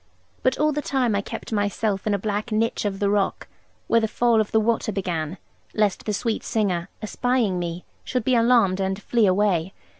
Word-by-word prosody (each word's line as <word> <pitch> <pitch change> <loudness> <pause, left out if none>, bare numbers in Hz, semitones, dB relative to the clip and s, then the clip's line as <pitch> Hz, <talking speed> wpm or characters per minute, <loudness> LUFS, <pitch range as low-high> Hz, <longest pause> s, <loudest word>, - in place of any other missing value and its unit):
But 255 0 +1
all 305 +1 +2
the 295 0 -2
time 255 -7 0
I 200 - +1
kept - - -7
myself 205 -1 -1
in 205 - +2
a - - 0
black 210 +3 -3
niche 220 0 0
of 200 -1 -1
the 200 - 0
rock, 205 -1 0 0.4
where 230 - +3
the 220 - +1
fall 230 0 +3
of 215 - -4
the 220 - +4
water 220 0 0
began, 180 -4 -3 0.4
lest 210 -3 +1
the - - +1
sweet 225 +2 -1
singer 195 -6 -1
(espying 230 -4 0
me) 175 0 -4 0.2
should 250 -3 -2
be 255 - +1
alarmed, 230 -5 +4
and 190 0 -1
flee 225 +1 +2
away. 185 -2 +1
210 Hz, 200 wpm, -24 LUFS, 195-230 Hz, 0.4 s, the